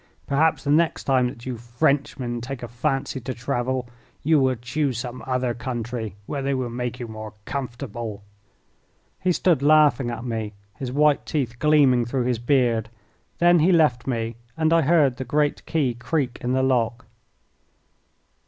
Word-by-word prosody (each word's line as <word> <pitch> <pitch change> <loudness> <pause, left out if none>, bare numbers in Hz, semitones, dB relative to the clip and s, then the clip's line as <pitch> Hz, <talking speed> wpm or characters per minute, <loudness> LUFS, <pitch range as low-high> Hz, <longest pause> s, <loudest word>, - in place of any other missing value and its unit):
Perhaps 155 +3 +2
the 145 - 0
next 160 +2 +2
time 130 -2 +3
that 120 -1 -8
you 125 -2 -4
Frenchmen 120 0 -1
take 125 +1 -6
a - - -4
fancy 135 +3 -2
to 130 +1 -5
travel 125 0 -2 0.4
you 155 0 +4
will 130 -1 +2
choose 125 +2 -2
some 120 +1 -5
other 125 -1 0
country 120 -3 -4
where 140 +4 -3
they 135 0 0
will 125 -2 -2
make 125 +1 -4
you 120 - -5
more 110 0 -8
comfortable." 120 -5 -5 1.0
He 185 - +1
stood 170 -4 +2
laughing 145 -4 +4
at 120 0 -5
me, 110 -3 -3 0.2
his 130 -2 -5
white 150 +1 +3
teeth 125 -6 -2
gleaming 140 -6 +4
through 125 +2 -1
his 125 -2 0
beard. 120 -3 +1 0.5
Then 175 0 +5
he 170 +5 +4
left 150 -9 +3
me, 115 -2 -2 0.2
and 160 0 +2
I 165 - +5
heard 145 -4 +3
the 130 - -3
great 145 +3 0
key 145 -7 +1
creak 125 +1 -2
in 125 +1 -1
the 130 0 +2
lock. 120 -2 +1
130 Hz, 165 wpm, -24 LUFS, 120-145 Hz, 1.0 s, Then